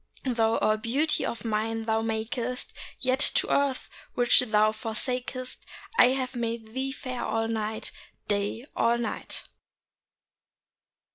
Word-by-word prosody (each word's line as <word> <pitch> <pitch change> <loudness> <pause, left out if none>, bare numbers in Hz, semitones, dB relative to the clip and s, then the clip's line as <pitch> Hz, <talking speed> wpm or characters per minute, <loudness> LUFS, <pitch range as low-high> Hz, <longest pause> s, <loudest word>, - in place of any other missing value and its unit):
Though 230 -3 +2
all 215 0 +3
beauty 270 +8 +1
of 230 -1 -5
nine 225 +1 -1
thou 220 0 +2
makest, 230 +3 -2 0.3
Yet 255 0 +1 0.2
to - - +3
earth 280 -2 +1 0.3
which 245 -1 +6
thou 215 -3 +4
forsakest 250 +3 -3 0.3
I 250 - +8
have 260 0 -1
made 230 -2 -3
thee 265 +1 -1
fair 255 -3 -5
all 225 0 0
night, 220 -1 -2 0.4
Day 205 +4 -1
all 235 +1 +3
night. 230 -3 -3
230 Hz, 125 wpm, -28 LUFS, 220-255 Hz, 0.4 s, I